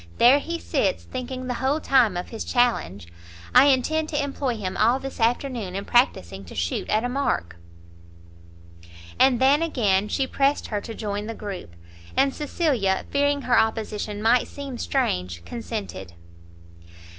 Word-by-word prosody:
there 255 +4 +6
he 335 +3 -4
sits, - - -1
thinking 255 0 -6
the 250 - -2
whole 275 +4 +1
time 250 - +3
of 180 - -5
his 225 - -5
challenge! 235 - 0 0.5
I 255 +2 +8
intend 305 +4 +2
to 295 -2 0
employ 275 -3 -2
him 190 -3 -4
all 235 +4 +3
this 270 -1 -7
afternoon 230 -4 -1
in 200 +1 -4
practising 95 - +1
to 85 - -11
shoot 85 0 -2
at 215 +2 +2
a - - 0
mark." 245 - -2 1.6
And 260 -3 +5
then 275 +4 +4
again 210 -11 +1
she 265 +5 0
pressed 275 +2 +1
her 210 -2 -2
to 225 - -8
join 205 -1 -4
the 230 - -5
group, 190 - -7 0.4
and 275 0 +3
Cecilia, 275 - 0
fearing 285 0 +1
her 245 -2 +4
opposition 215 -1 -2
might 235 +2 +3
seem 275 -4 -7
strange, 90 - -1
consented. 210 - -6
240 Hz, 155 wpm, -24 LUFS, 205-270 Hz, 1.6 s, I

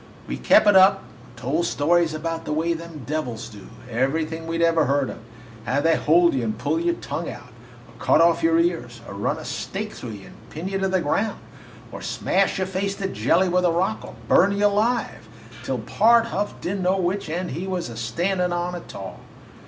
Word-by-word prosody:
We - - -3
kep' - - +5
it 205 -1 +5
up 195 +1 +6 0.2
and 125 - -20
told 150 +8 -1
stories 165 +2 +2
about 165 +1 -4
the - - -4
way 165 +2 +1
them 165 -4 -8
devils 130 -8 -4
do 105 -3 -12 0.2
everything 155 +7 -1
we 165 0 -2
'd 170 - +1
ever 165 -2 +3
heard 140 0 +1
of - - -10 0.5
how 130 +4 +1
they 165 +2 +3
hold 170 +3 +4
you 130 -3 0
and 110 -1 -2
pull - - -1
out 335 - -1
your 345 0 +2
tongue, - - -5
or - - -8 0.6
cut - - +3
off 165 0 +4
your 165 0 +3
ears, 165 -9 -1
or - - -7
run 100 +1 -1
a - - -8
stake - - -4
through 115 - -7
you 100 -2 -10
and 110 - -16
pin 165 +4 -6
you 195 0 -2
to 195 - +1
the 190 -1 +1
ground, 200 +8 0 0.5
or - - -8
smash 195 +1 0
your 190 - 0
face 195 +1 -2
to 195 - -7
a - - +1
jelly 190 0 +2
with 180 0 +1
a 175 - +4
rock, 185 +6 0
or - - -10
burn 200 +3 +5
you 205 - +2
alive, 205 - 0 0.3
till 130 - -2
Pard 225 - +4
Huff 205 -3 -3
did 195 +3 -2
n't - - -3
know 185 +1 +2
which 185 -1 -1
end 175 +2 -3
he 170 +8 -4
was 180 -2 -2
a 115 - -8
standin' 180 - -1
on 175 +1 -2
a 175 - -4
tall. 95 - -9
170 Hz, 225 wpm, -23 LUFS, 145-190 Hz, 0.6 s, up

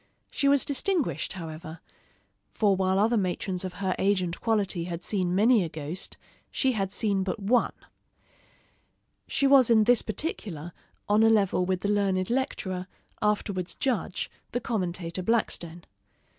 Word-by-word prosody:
She 280 - 0
was 280 -1 +4
distinguished, 320 +2 -1
however; 160 -2 -8 0.7
for 205 -3 +2
while 190 0 +1
other 225 +4 +3
matrons 185 -1 -2
of 185 -1 -4
her 190 0 -2
age 195 -1 +2
and 175 0 -4
quality 200 -6 0
had 175 -1 -5
seen 185 -4 -1
many 220 +1 +5
a 165 - -4
ghost, 155 +4 -5 0.3
she 265 - +1
had 195 -5 -2
seen 200 -2 0
but 190 +3 -2
one. 230 +5 +2 1.5
She 280 - 0
was 270 -3 +6
in 220 -2 +6
this 245 +2 +4
particular 185 - -4 0.3
on 210 +1 +4
a 225 - +6
level 195 -4 +2
with 185 -1 0
the - - -1
learned 195 -1 +1
lecturer, 190 -8 -2 0.3
afterwards 205 -3 -1
judge, 235 -7 -2 0.2
the 245 - 0
commentator 180 -6 -2
Blackstone. 175 -5 -1
195 Hz, 145 wpm, -27 LUFS, 180-225 Hz, 1.5 s, was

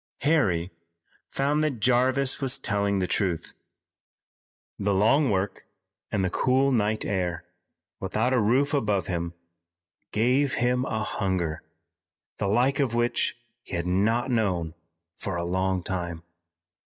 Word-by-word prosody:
Harry 95 - +2 0.6
found 145 +3 0
that 140 -6 -1
Jarvis 130 +4 +2
was 135 -1 +2
telling 100 -1 0
the 95 - +1
truth. 90 -3 -1 1.3
The 100 0 +1
long 130 +8 +4
work 95 0 -2 0.4
and 95 -2 +1
the 95 - -1
cool 130 +2 +2
night 110 -3 +1
air, 90 -4 -2 0.5
without 110 +6 0
a 125 - +3
roof 130 +7 +2
above 105 -9 +1
him, 85 -2 -3 0.8
gave 130 +5 +2
him 125 +1 +1
a 110 -3 -2
hunger, 90 -7 -2 0.8
the 100 - 0
like 125 +7 +2
of 130 -5 +1
which 120 0 +1 0.2
he - - -7
had 85 0 -2
not 110 +8 +1
known 90 -9 0 0.4
for 95 - -4
a 85 0 -2
long 95 +1 0
time. 85 -3 -4
105 Hz, 130 wpm, -26 LUFS, 95-130 Hz, 1.3 s, long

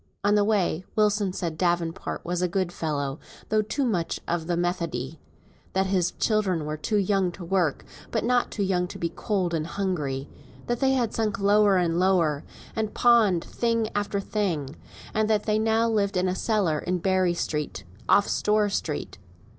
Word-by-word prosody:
On 205 +1 +3
the 210 -1 +4
way 195 -5 +1
Wilson 210 -2 +2
said 170 -3 -4
Davenport 175 -2 -1
was 175 +1 -1
a 180 - +2
good 185 0 -1
fellow, 145 -4 -3 0.3
though 215 0 +3
too 265 +6 -1
much 180 -9 -1
of 165 -1 -1
the 175 -1 0
Methodee; 165 -5 -2 0.5
that 190 0 +2
his 185 -2 +1
children 195 -8 0
were 150 0 -3
too 210 +8 -1
young 195 -2 +2
to 175 - -8
work, 175 -5 0 0.2
but 225 - -1
not 245 +1 +2
too 205 - -2
young 180 -2 +1
to - - -8
be 170 - -1
cold 185 -5 -1
and 160 -1 -1
hungry; 150 -9 -2 0.4
that 240 -1 -1
they 265 0 +3
had 240 -4 0
sunk 215 -3 0
lower 205 0 +4
and 170 -1 +1
lower, 170 -6 +2 0.3
and 220 -2 -2
pawned 220 -8 +4
thing 230 -2 0
after 205 -1 -1
thing, 175 -9 -2 0.4
and 215 0 +1
that 215 -1 +1
now 220 +2 +2
they 225 - 0
lived 200 -3 +1
in 180 +1 +2
a 180 - +1
cellar 185 -6 +1
in 180 +3 -1
Berry 185 -1 +1
Street, 150 - -3 0.3
off 200 - +5
Store 210 0 +2
Street. 150 - -3
190 Hz, 180 wpm, -26 LUFS, 170-210 Hz, 0.5 s, off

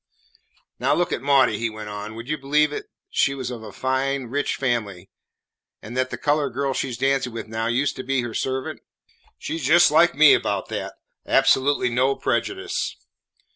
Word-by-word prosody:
"Now - - +2
look 175 - 0
at - - -2
Maudie," 135 -6 +3
he 115 0 -1
went 110 -1 -8
on; 105 +1 -7
"would 115 +2 -8
you 155 - 0
believe 150 +1 +1
it - - -3
that - - -5 0.3
she 140 - +2
was 130 -2 -4
of 120 -2 -7
a 110 -2 -9
fine, 130 +1 -1
rich 145 +1 -1
family, 105 -8 -2 0.7
and 115 +3 -9
that 130 0 0
the - - -5
coloured 145 -4 0
girl 140 0 0
she 130 - -2
's 120 - -5
dancing 135 -1 +1
with 115 -1 -6
now 110 +1 -2
used 130 +5 0
to 130 - -5
be 135 0 0
her 120 -2 -5
servant? 130 +2 -3 0.6
She 165 - -4
's - - -7
just 170 +5 +5
like 160 +1 +4
me 150 0 +7
about - - -1
that. - - -5 0.3
Absolutely 135 -1 +3
no 130 +3 +2
prejudice." 380 -1 -2
130 Hz, 195 wpm, -23 LUFS, 115-145 Hz, 0.7 s, me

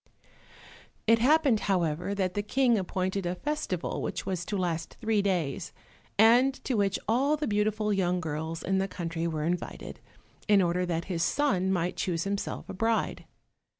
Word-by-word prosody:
It 230 +1 +5
happened, 275 -2 +4
however, 180 -1 0
that 185 -2 -1
the 205 - -1
King 245 +3 +2
appointed 190 -1 -1
a 175 - -1
festival 295 - -3
which - - -3
was 185 -2 -2
to 205 - -2
last 170 -3 -2
three 220 -3 +1
days, 180 -4 -1 0.4
and 240 +5 +6
to 265 - -1
which 200 -3 +1
all 270 +7 +2
the 300 - -2
beautiful 210 -1 +1
young 180 -2 +1
girls 160 0 -4
in 190 0 +1
the 195 - 0
country 165 -3 -3
were 155 -2 -2
invited, 175 +2 -4 0.5
in 205 -2 +6
order 180 0 +1
that 170 -1 -2
his 175 -3 -2
son 190 - +1
might 180 -1 -1
choose 170 -3 -1
himself 200 0 -3
a - - -6
bride. 225 +3 0
195 Hz, 165 wpm, -28 LUFS, 175-220 Hz, 0.5 s, and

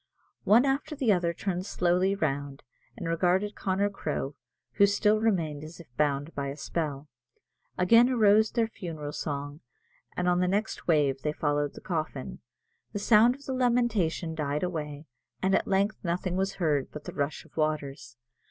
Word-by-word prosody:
One 235 +6 +6
after 275 +3 -1
the 265 -6 +2
other 175 -2 +1
turned 180 +1 -3
slowly 180 +2 +2
round, 145 -5 -3 0.3
and 180 -6 -5
regarded 180 +5 +1
Connor 200 +1 0
Crowe, 150 -6 -3 0.4
who 200 - +7
still 210 +1 +2
remained 165 -9 0
as 155 +3 -10
if 135 -8 -15
bound 145 +1 0
by 140 -1 -3
a 140 +1 -5
spell. 150 -2 -3 0.7
Again 230 +7 +6
arose 220 -3 +4
their 230 -1 +1
funeral 160 -9 -6
song; 145 0 -4 0.6
and 180 - 0
on 180 0 +3
the 180 - +2
next 205 +4 -2
wave 145 -5 +2
they 150 +2 -1
followed 145 -1 -1
the - - -10
coffin. 155 -6 -4 0.5
The - - -2
sound 225 +4 +5
of 280 0 -16
the 265 - -3
lamentation 235 -10 +1
died 150 -1 -2
away, 150 -4 -4 0.3
and 190 0 +1
at - - +2
length 200 +2 0
nothing 180 +1 -1
was 195 +1 0
heard 150 -6 0
but 150 - -8
the - - -7
rush 145 +1 -3
of - - -22
waters. 150 -5 -2
175 Hz, 170 wpm, -28 LUFS, 150-205 Hz, 0.7 s, who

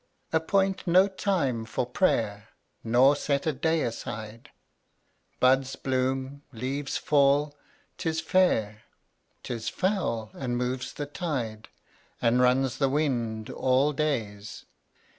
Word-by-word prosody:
132 160 - +4
Appoint 190 +4 0
no 185 +3 +6
time 175 - -1
for 115 - -2
prayer 110 - 0 0.4
Nor 125 +5 +5
set 140 -1 -1
a 155 - +1
day 160 +4 +1
aside; 110 -1 -6 0.9
Buds 130 +1 +3
bloom, 130 +1 -2
leaves 135 +4 -3
fall, 145 0 +2 0.4
'tis 160 -2 -1
fair, 135 - +1 0.6
'Tis 115 -2 -4
foul, 165 - -1
and 120 -2 -3
moves 125 +1 -3
the 145 - -4
tide 130 -9 -4 0.5
And 120 +2 +3
runs 130 0 +2
the 135 -2 +3
wind, 120 -7 -1
all 135 +3 +2
days. 110 -9 -3
130 Hz, 115 wpm, -27 LUFS, 115-150 Hz, 0.9 s, no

